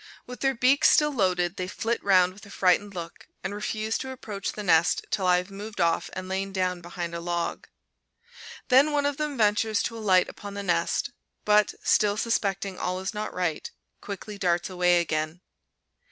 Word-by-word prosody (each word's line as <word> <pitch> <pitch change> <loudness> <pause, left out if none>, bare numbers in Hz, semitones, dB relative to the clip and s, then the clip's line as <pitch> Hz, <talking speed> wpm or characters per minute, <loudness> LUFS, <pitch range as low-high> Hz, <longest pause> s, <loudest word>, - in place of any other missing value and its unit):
With 250 0 -9
their 270 -1 +1
beaks 255 +4 +4
still 300 0 +4
loaded, 180 -5 +1
they 185 - -3
flit 225 +4 -2
round 185 -2 +4
with 205 - -16
a - - -14
frightened 200 +1 +1
look, 170 -1 -8 0.2
and 195 +2 -3
refuse 215 +1 -2
to 265 - -5
approach 215 -6 -5
the 210 - -6
nest 170 -3 +3
till 190 -2 0
I 180 0 +5
have 180 +2 -4
moved 205 +2 -8
off 170 -1 +1
and 185 0 -6
lain 195 +1 -2
down 185 -2 -1
behind 170 0 -6
a 170 - -3
log. 170 0 -3 1.0
Then 275 +4 +5
one 290 -1 +1
of 285 -1 0
them 300 -2 -3
ventures 215 0 +2
to 230 - -4
alight 190 -4 +3
upon 200 -1 -9
the 200 - -4
nest, 170 +5 0 0.3
but, 210 -1 +3
still 205 -1 +3
suspecting 195 -4 -1
all 185 +1 -2
is 190 +4 -4
not 210 0 -4
right, 175 -4 -2 0.3
quickly 205 +1 -7
darts 175 0 0
away 180 -1 +3
again. 155 +1 -3
195 Hz, 185 wpm, -26 LUFS, 180-215 Hz, 1.0 s, I